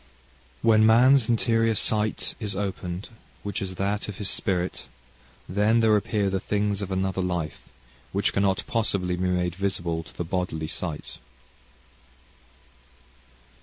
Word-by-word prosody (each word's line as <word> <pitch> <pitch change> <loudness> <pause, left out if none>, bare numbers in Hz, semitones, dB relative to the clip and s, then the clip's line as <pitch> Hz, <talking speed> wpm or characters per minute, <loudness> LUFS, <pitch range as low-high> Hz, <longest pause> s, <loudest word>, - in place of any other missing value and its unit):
"When 110 -1 +5
man's 120 +3 +6
interior 115 -1 +2
sight 105 0 -1
is 105 -4 -3
opened, 95 -2 -4 0.3
which 105 +2 -3
is 95 -1 -4
that 100 +2 -1
of 105 -2 -6
his 105 - -1
spirit, 90 -1 -2 0.6
then 105 +5 +3
there 110 -2 +5
appear 105 0 +1
the 95 - 0
things 105 +1 -1
of 100 - -4
another 95 0 -1
life, 85 -5 -3 0.4
which 100 +1 +1
cannot 100 -1 +1
possibly 100 -6 0
be 90 +1 -1
made 90 -1 0
visible 90 -3 -1
to 75 - -15
the 85 - -2
bodily 90 -3 -2
sight."... 80 -1 -5
100 Hz, 130 wpm, -26 LUFS, 90-105 Hz, 0.6 s, man's